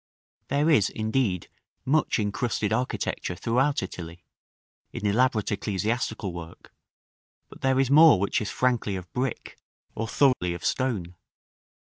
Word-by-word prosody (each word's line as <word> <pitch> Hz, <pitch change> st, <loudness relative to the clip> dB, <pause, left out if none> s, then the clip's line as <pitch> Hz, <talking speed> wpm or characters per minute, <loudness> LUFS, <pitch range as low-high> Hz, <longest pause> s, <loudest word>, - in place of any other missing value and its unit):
There 145 Hz, +3 st, +1 dB
is, 140 Hz, -12 st, +4 dB
indeed, 110 Hz, -5 st, -1 dB, 0.4 s
much 150 Hz, +4 st, +2 dB
incrusted 110 Hz, 0 st, -1 dB
architecture 120 Hz, -6 st, -2 dB
throughout 125 Hz, +6 st, +1 dB
Italy, 85 Hz, -2 st, -8 dB, 0.7 s
in -, -, -6 dB
elaborate 110 Hz, +1 st, +2 dB
ecclesiastical 105 Hz, 0 st, -2 dB
work, 85 Hz, -1 st, -10 dB, 0.8 s
but -, -, -14 dB
there 135 Hz, 0 st, +2 dB
is 135 Hz, -1 st, +1 dB
more 155 Hz, -, +8 dB
which 100 Hz, +3 st, 0 dB
is 105 Hz, -, -3 dB
frankly 120 Hz, -6 st, 0 dB
of 90 Hz, -3 st, -8 dB
brick, 125 Hz, -1 st, -4 dB, 0.3 s
or 115 Hz, -, -3 dB
thoroughly 110 Hz, -8 st, +2 dB
of 85 Hz, -, -8 dB
stone. 105 Hz, -10 st, -1 dB
110 Hz, 125 wpm, -26 LUFS, 95-130 Hz, 0.8 s, more